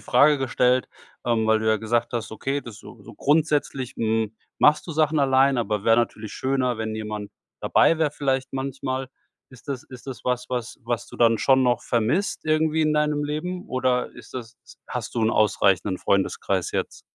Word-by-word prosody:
Frage 145 +4 +5
gestellt 125 -1 +1 0.4
ähm, 115 -2 +1
weil 110 0 +4
du 110 - -3
ja 110 0 +4
gesagt 120 +2 -1
hast, 115 -2 -3
okay, 135 +5 -2
das 115 -5 -10
so - - -13
so - - -12
grundsätzlich, 145 -4 0
hm, 110 -1 -1 0.2
machst 150 +3 +4
du 165 - -5
Sachen 155 0 +2
alleine, 135 -1 +3
aber 105 -3 -2
wäre 115 0 +5
natürlich 110 -2 -1
schöner, 130 -3 0
wenn 110 -1 -3
jemand 105 -1 -5 0.3
dabei 165 - +3
wäre, 155 -2 +2
vielleicht 135 -2 -1
manchmal. 130 -1 -3 0.4
Ist 130 +2 -17
das 135 -3 -3
ist 130 +1 -13
das 130 -3 -8
was, 125 0 -1
was 125 -2 -4
was 120 -1 -2
du - - -12
dann 115 -1 +4
schon 130 +2 +4
noch 125 -1 +2
vermisst, 120 - 0
irgendwie 155 0 +2
in 155 0 +2
deinem 150 -1 +1
Leben, 180 +5 -4
oder 130 -1 0
ist 120 -2 -14
das 115 -3 -7 0.3
hast - - -5
du 115 - 0
'n 110 - +3
ausreichenden 100 -3 +2
Freundeskreis 100 -1 0
jetzt? - - -3
125 Hz, 185 wpm, -24 LUFS, 115-140 Hz, 0.4 s, Frage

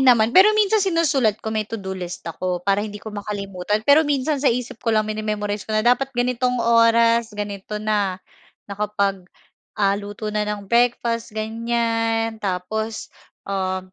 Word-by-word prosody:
naman, 240 -4 +5
pero 420 +6 +7
minsan 430 0 +3
sinusulat 305 - +2
ko, 220 - -2
may 215 -1 -2
todo-list 190 -5 -6
ako 180 +1 -3
para 200 0 +2
hindi 210 0 -5
ko 210 +1 -9
makalimutan 205 0 -3
pero 285 +2 +6
minsan 285 0 0
sa 280 - +3
isip 240 -1 -2
ko - - -3
lang 215 -1 +3
mine-memorize 210 -1 -3
ko 215 - 0
na 215 - +1
dapat 250 +3 +3
ganitong 250 0 +1
oras, 230 0 +4
ganito 205 0 -5
na, 210 -3 0 0.5
nakapag, 200 -1 -1 0.6
ah, 200 -1 +3
luto 205 +1 -6
na 210 0 -1
ng 205 -1 -4
breakfast, 235 +1 +1
ganiyan, 225 0 -1
tapos, 210 +3 -3 0.3
um, 185 -1 -3
215 Hz, 150 wpm, -22 LUFS, 205-235 Hz, 0.6 s, pero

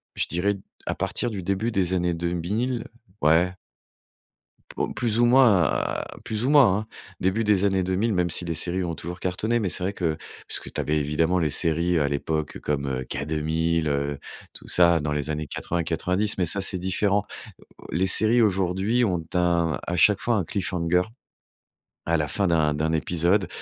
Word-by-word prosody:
Je - - 0
dirais 100 +4 0 0.3
à - - -1
partir 120 - -2
du 100 -4 -5
début 100 +5 -1
des 95 -3 0
années 90 -1 0
2000. 90 +9 -2 0.4
Ouais. 80 +4 +3 1.2
Oh, - - 0
plus 115 -2 -1
ou 120 - +5
moins 120 - +5
heu, - - -3
plus 110 +1 -3
ou - - +1
moins, 130 -10 +6
hein, 110 - -5 0.3
début 95 +5 0
des 105 -3 +2
années 95 -2 +2
2000, 95 +5 0
même 90 -1 +1
si 90 - +1
les 85 -1 -3
séries 90 +3 -1
ont 85 -1 -3
toujours 85 +3 -7
cartonné. 110 +6 -1
Mais 105 -5 -1
c'est 90 - -3
vrai 95 +2 -1
que 85 -5 -1 0.3
puisque - - -5
tu - - -2
avais, 75 +1 0
évidemment, 80 +5 +1
les 80 -2 +1
séries 85 +3 +1
à 75 - +2
l'époque 75 +2 -2
comme 70 -3 -2
K 70 +2 -4
2000, 80 +1 0
heu, 70 0 -1 0.3
tout - - -11
ça 85 -2 +4
dans 75 0 -2
les 75 0 -2
années 75 0 -3
80-90. 90 +6 -1
Mais 90 - +2
ça, 100 +4 +1
c'est 95 -1 0
différent. 95 +2 0 0.4
Heu, - - -17 0.3
les 90 +4 +1
séries 110 +5 +4
aujourd'hui, 95 +3 +1
ont 90 -5 -1
un 85 -4 +2
à 90 - -2
chaque 105 +3 +5
fois 120 - +1
un 100 - +1
cliffhanger 90 -2 0 1.0
à 85 0 +2
la 75 -1 -1
fin 100 +3 +1
d'un 80 -3 +2
d'un 80 +2 -1
épisode. 85 +4 +1
90 Hz, 185 wpm, -25 LUFS, 80-100 Hz, 1.2 s, moins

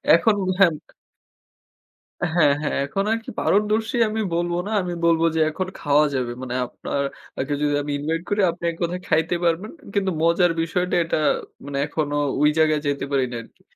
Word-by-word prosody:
এখন 210 +5 +3 0.2
হ্যাঁ 185 -4 +7 1.6
হ্যাঁ, 155 -5 +5
হ্যাঁ, 150 - -1
এখন 195 +7 -1
আর 225 - +2
কি - - -7
পারদর্শী 215 +3 +1
আমি 220 +1 -2
বলব 175 +1 0
না। - - -4
আমি 175 -1 -3
বলব 165 -1 +3
যে, - - +1
এখন 185 +4 -3
খাওয়া 145 +1 +3
যাবে। 125 -2 -1
মানে 125 -1 -4
আপনার 140 - -4 0.4
আগে 140 +2 -1
যদি 145 -1 +1
আমি 145 - -4
invite 165 +3 -2
করি 205 0 +1
আপনি 170 - -14
এককথায় 175 +2 -3
খাইতে 160 +2 +2
পারবেন। 170 +6 0 0.2
কিন্তু 195 -2 +1
মজার 170 +1 +4
বিষয়টা 180 +2 -1
এটা 165 - 0 0.5
মানে 140 -1 -4
এখনো 145 -1 -2 0.3
ঐ - - +4 0.2
জায়গায় 155 -1 +3
যেতে 140 -1 -1
পারি 135 -2 +2
নাই 120 - -4
আরকি। - - -22
165 Hz, 175 wpm, -23 LUFS, 145-180 Hz, 1.6 s, হ্যাঁ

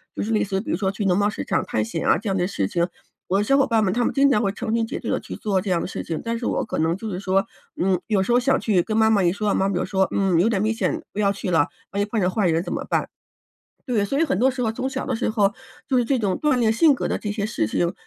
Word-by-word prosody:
就 - - -3
是 220 - -2
类 215 - +2
似 195 -1 -1
比 - - -8
如 - - 0
说 195 -1 0
去 205 +1 -4
农 180 0 +3
贸 205 +1 +2
市 - - -5
场 - - 0
探 110 - -1
险 110 - -4
啊， - - +4
这 210 -1 -4
样 190 - 0
的 180 0 +1
事 100 - -1
情。 170 - 0 0.4
我 195 +2 +1
的 - - +2
小 275 +6 +3
伙 275 - +4
伴 225 -3 +2
们， 185 - +1
他 240 +3 +1
们 - - 0
经 280 0 +4
常 215 - +3
会 195 - +1
成 220 +2 -3
群 230 -1 +1
结 - - -5
队 - - -5
地 - - 0
去 - - -8
做 200 -3 0
这 190 0 -3
样 170 - +1
的 - - -3
事 - - -5
情。 165 -2 -4
但 230 0 -2
是 235 - -5
我 - - 0
可 - - -4
能 165 +2 +1
就 220 +2 -6
是 180 -1 -4
说 195 0 +1 0.3
嗯， 185 -1 +1
有 205 -4 +1
时 195 - -1
候 245 - +5
想 270 +2 +2
去， 190 -6 +2
跟 215 - -3
妈 220 0 +4
妈 205 -4 +3
一 175 +1 +3
说， 210 0 -1
妈 195 - +2
妈 195 - -1
就 - - 0
说： 190 -1 +1
“嗯， 190 -4 +2
有 200 - +4
点 205 -4 +1
危 215 +1 +1
险， 320 +8 -1
不 - - -13
要 200 -1 +3
去 195 -1 -5
了， 165 -4 +3 0.3
万 200 - -3
一 205 - +2
碰 215 0 -2
着 180 - +2
坏 200 -1 +1
人 165 0 +2
怎 - - -6
么 - - -3
办？” - - 0 0.8
对， 220 -5 +1
所 275 +8 -1
以 325 - +3
很 185 - 0
多 260 +4 +3
时 250 -1 -5
候 225 - +1
从 260 +3 -2
小 - - -4
的 255 - -1
时 225 - -1
候 205 -2 +2 0.3
就 260 - +2
是 245 - +3
这 260 +1 0
种 200 -4 0
锻 300 -4 +3
炼 225 -2 +2
性 300 +4 +5
格 - - -2
的 - - -1
这 210 - -4
些 205 -1 -2
事 215 - -1
情， 170 - 0
205 Hz, 360 characters per minute, -23 LUFS, 190-230 Hz, 0.8 s, 候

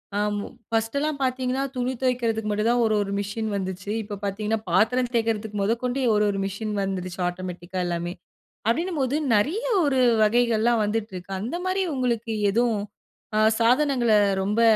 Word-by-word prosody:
அ - - +1 0.2
ம் 205 - -3 0.3
ஃபர்ஸ்ட்டுல்லாம் 280 +7 0
பார்த்தீங்ன்னா, 255 +1 0
துணி 250 +1 -1
துவைக்கிறதுக்கு 230 -4 0
மட்டும்தான் 230 +3 +2
ஒரு, 220 -1 +2
ஒரு 195 - -5
மிஷின் 210 +2 -3
வந்துச்சு. 190 +1 -4
இப்ப 205 -1 -6
பார்த்தீங்ன்னா, 210 +2 -1
பாத்திரம் 240 +7 +2
தேய்க்கிறதுக்கு 220 -2 -1
முதகொண்டு 245 +5 0
ஒரு, 210 - +3
ஒரு 195 - -3
மிஷின் 210 +2 -4
வந்துருச்சு 185 -1 -4
ஆட்டோமேட்டிக்கா 180 0 -6
எல்லாமே. 175 0 -2 0.5
அப்பிடினம்போது 285 +1 0 0.2
நிறைய 305 - +1 0.2
ஒரு 270 -2 +2 0.2
வகைகள்லாம் 235 0 +3
வந்திட்டு 215 0 -2
இருக்கு. 180 +1 -8
அந்தமாரி 360 - -1
உங்களுக்கு 235 -3 -1 0.2
எதும் 230 +1 +2 0.6
ஆ - - +4 0.2
சாதனங்கள 250 -1 +3 0.3
ரொம்ப 210 +4 +1
225 Hz, 140 wpm, -25 LUFS, 205-250 Hz, 0.6 s, ஆ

